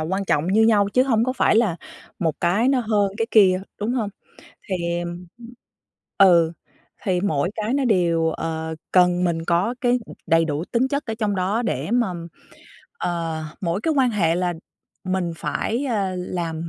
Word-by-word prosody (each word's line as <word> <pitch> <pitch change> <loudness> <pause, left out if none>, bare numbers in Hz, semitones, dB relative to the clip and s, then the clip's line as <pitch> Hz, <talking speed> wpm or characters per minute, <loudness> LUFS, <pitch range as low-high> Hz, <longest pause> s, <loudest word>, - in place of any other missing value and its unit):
quan 190 +5 -2
trọng 150 -2 +1
như 210 +4 +3
nhau 210 -3 +4
chứ 250 +5 +3
hông 230 -4 +2
có 255 - -1
phải 235 - +2
là 215 -8 +2 0.4
một 160 -3 0
cái 195 +9 +2
nó 265 -2 +3
hơn 205 -3 +1
cái 225 - 0
kia, 190 -3 +5 0.2
đúng 225 +4 -1
hông? 220 -5 -1 0.6
Thì, 170 -2 -1
ừm 175 +1 -7 0.9
ừ, 170 -4 +6 0.5
thì 180 -2 0
mỗi 175 -3 0
cái 220 +4 -1
nó 280 -1 +1
đều, 170 -7 +2
ờ, 160 0 -4 0.2
cần 180 -1 +4
mình 165 -2 -1
có 180 +8 +1
cái, 245 -1 +2
ừm, - - -10
đầy 165 0 +4
đủ 150 +1 -2
tính 240 +6 0
chất 280 0 -2
ở 225 - -3
trong 210 -3 0
đó 200 +6 0
để 160 - -2
mà, 235 -6 +1 0.9
ờ, 165 -2 -3 0.2
mỗi 175 +2 -1
cái 320 +3 0
quan 255 -3 +3
hệ 170 -6 +1
là 175 -1 -1 0.5
mình 185 -2 -1
phải, 240 +10 -2
à, 200 -7 -1
làm 170 -2 -4
185 Hz, 180 wpm, -22 LUFS, 170-225 Hz, 0.9 s, ừ